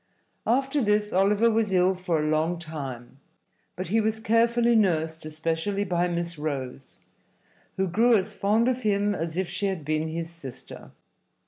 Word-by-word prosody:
After 270 +4 +1
this 210 -1 +1
Oliver 205 +5 +3
was 220 -2 +1
ill 185 0 +3
for 180 -3 -1
a 150 - -1
long 155 +3 +1
time, 135 -6 -7 0.6
but 180 -2 -5
he 225 +3 +3
was 220 +1 -1
carefully 235 +2 +3
nursed, 160 -7 +1
especially 165 +6 -2
by 180 -2 0
Miss 170 -2 -3
Rose, 135 -3 -5 0.8
who 190 0 +1
grew 225 +6 +4
as 200 +2 -2
fond 215 +4 +2
of 255 0 0
him 205 -2 +1
as 165 -2 -3
if 190 -1 0
she 200 - -2
had 185 -6 -3
been 155 +1 0
his 165 +1 -4
sister. 140 -7 -10
185 Hz, 160 wpm, -26 LUFS, 160-215 Hz, 0.8 s, grew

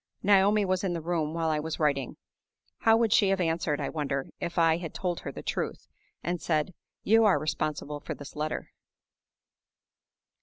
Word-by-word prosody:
Naomi 200 +1 +4
was 185 0 0
in 185 -2 0
the 170 - -2
room 165 -1 -1
while 165 -1 0
I 155 - 0
was 160 +1 -4
writing. 140 -4 0 0.6
How 225 0 +5
would 230 -2 +3
she 200 - +5
have 195 0 +1
answered, 165 -3 0
I 140 - -2
wonder, 140 -3 -3
if 170 +1 -4
I 165 -1 +4
had 170 -3 -7
told 180 -2 -2
her 140 - -6
the - - -9
truth, - - -3 0.4
and 175 -1 -2
said, 155 +2 0 0.3
"You 225 +2 +5
are 195 -7 +5
responsible 150 0 -2
for - - -6
this 145 - -11
letter?" 150 +1 -3
165 Hz, 180 wpm, -28 LUFS, 150-185 Hz, 0.6 s, How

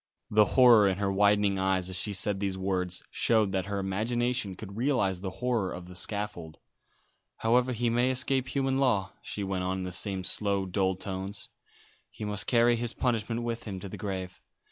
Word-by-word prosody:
The 105 0 +6
horror 120 -5 +8
in 95 -1 0
her 100 -1 0
widening 100 0 +3
eyes 95 -1 +1
as 95 - -5
she 105 +3 -1
said 100 +1 +1
these 95 -1 -2
words 90 -1 -2
showed 110 -4 +2
that 95 0 -1
her 100 0 -2
imagination 110 +2 -1
could 100 +1 -9
realise 115 -7 +1
the 95 0 -4 0.2
horror 115 -7 +1
of 90 - -7
the 90 - -11
scaffold. 90 -4 -1 0.8
"However 125 +3 +2
he 120 -1 0
may 120 +2 +2
escape 130 0 0
human 135 0 0
law," 110 -8 +1
she 105 - -4
went 95 -1 -2
on, 95 +1 -1
in 95 - -4
the 90 - -4
same 95 +1 -2
slow, 100 +1 0
dull 95 0 0
tones, 95 +1 -6 0.6
"he 105 - -7
must 105 0 -3
carry 120 0 +4
his 120 0 -4
punishment 115 -1 -1
with 115 0 -4
him 100 -4 -5
to 100 - -7
the - - -7
grave. 95 -3 -5
100 Hz, 190 wpm, -29 LUFS, 95-115 Hz, 0.8 s, horror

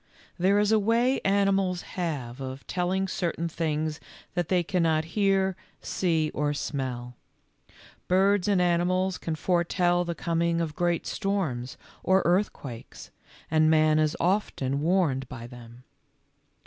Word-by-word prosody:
There 190 +3 +3
is 210 +1 +2
a 220 - +5
way 235 +5 +2
animals 195 -2 +1
have 140 -8 -4
of 130 +1 -6
telling 185 +2 -1
certain 170 -2 -2
things 155 -2 -2 0.3
that 175 -3 -1
they 180 -2 +2
cannot 165 -3 +1
hear, 195 -2 +2 0.2
see, 160 -4 0
or 145 0 -1
smell. 125 -4 -4 0.9
Birds 195 +1 +3
and 200 -3 +3
animals 180 +1 +1
can 165 - -3
foretell 175 +1 +1
the 170 -1 -4
com 165 0 -1
ing 170 0 +1
of 160 -3 -2
great 175 -1 0
storms 170 -12 -2 0.2
or 190 +1 +3
earthquakes, 170 - -2 0.4
and 155 0 +4
man 155 -1 +4
is 155 0 +1
often 145 -8 0
warned 150 -6 +1
by 120 -2 -8
them. 120 0 -12
170 Hz, 135 wpm, -27 LUFS, 150-190 Hz, 0.9 s, a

